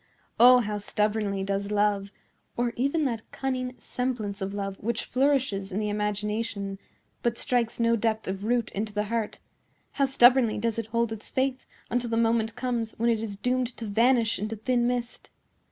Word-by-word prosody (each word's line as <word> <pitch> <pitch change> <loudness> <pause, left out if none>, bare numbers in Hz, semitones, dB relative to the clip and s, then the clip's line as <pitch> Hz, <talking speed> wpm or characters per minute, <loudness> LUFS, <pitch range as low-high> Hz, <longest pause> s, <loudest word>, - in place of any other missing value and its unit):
Oh, 250 +1 +8
how 210 -2 -3
stubbornly 210 -1 0
does 200 +1 -2
love,—or 210 +3 -2
even 280 +5 +1
that 230 -4 -1
cunning 255 -2 -3
semblance 225 -6 -3
of 190 0 -2
love 195 -1 -4
which 225 +1 -2
flourishes 255 -7 +1
in 185 - -3
the 210 -1 -1
imagination, 210 -1 -2 0.4
but 235 -1 0
strikes 240 -2 0
no 230 0 +3
depth 220 -1 -1
of 190 +1 -3
root 235 +1 0
into 210 +1 -3
the 210 0 0
heart,—how 230 +4 -4
stubbornly 250 -3 +5
does 230 +1 -1
it 225 - -4
hold 230 0 0
its 220 -1 -7
faith 260 0 -1 0.2
until 240 0 0
the 230 - 0
moment 225 -1 +1
comes 235 -3 -2
when 235 +1 +2
it 225 - +1
is 215 -3 -4
doomed 250 +3 -1
to 230 - -5
vanish 230 +2 +3
into 215 +2 -3
thin 240 +2 +1
mist! 245 -1 -3
225 Hz, 170 wpm, -27 LUFS, 210-245 Hz, 0.4 s, Oh